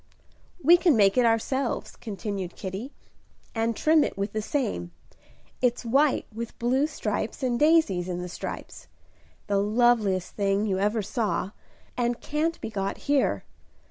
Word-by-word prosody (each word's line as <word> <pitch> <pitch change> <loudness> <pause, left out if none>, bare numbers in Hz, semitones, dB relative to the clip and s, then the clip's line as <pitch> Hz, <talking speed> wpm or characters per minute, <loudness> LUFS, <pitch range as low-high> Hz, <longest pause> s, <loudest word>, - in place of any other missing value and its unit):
"We 345 +5 +8
can 340 -7 +3
make 200 -2 +5
it 250 -2 +4
ourselves," 240 +3 -1
continued 200 -4 -5
Kitty, 195 +8 -6 0.6
"and 230 0 0
trim 310 +3 +4
it - - -3
with 200 +1 -2
the 215 - -1
same. 215 - -2 0.7
It's 245 -1 +1
white 275 +5 +3
with 230 +1 -6
blue 260 +5 +2
stripes 295 -1 -3
and 245 -2 0
daisies 295 - +3
in 175 -1 -3
the 180 - -4
stripes; 175 - -7 0.6
the 200 -1 +1
loveliest 210 -3 +2
thing 200 0 +1
you 190 -3 0
ever 210 +2 +1
saw, 205 -2 -1 0.4
and 240 -1 0
can't 315 +3 -1
be 225 - -5
got 195 -2 -2
here. 285 -1 +2
225 Hz, 145 wpm, -26 LUFS, 200-265 Hz, 0.7 s, We